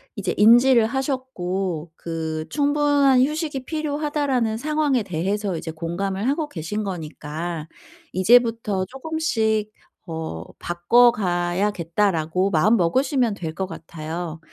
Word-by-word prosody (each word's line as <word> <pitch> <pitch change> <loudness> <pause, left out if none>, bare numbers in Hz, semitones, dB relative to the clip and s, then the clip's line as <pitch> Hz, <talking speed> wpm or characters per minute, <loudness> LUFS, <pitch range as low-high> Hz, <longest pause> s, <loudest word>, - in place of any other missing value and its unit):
이제 195 -5 -2
인지를 235 +3 +6
하셨고 195 - -3
그 160 -2 -4
"충분한 285 -3 +3
휴식이 300 -3 -3
필요하다."라는 290 -6 -1
상황에 295 -1 +1
대해서 195 +2 -2
이제 160 - -5
공감을 190 +6 -3
하고 300 +2 -1
계신 180 +6 -4
거니까 165 -2 -5 0.5
이제부터 220 -1 +3
조금씩 225 -5 -1 0.3
어 160 - -5 0.2
'바꿔가야겠다.'라고 180 -3 +1
마음먹으시면 230 - +2
될 160 -4 -6
것 190 - -2
같아요. 165 -1 -6
205 Hz, 275 characters per minute, -23 LUFS, 170-260 Hz, 0.5 s, 인지를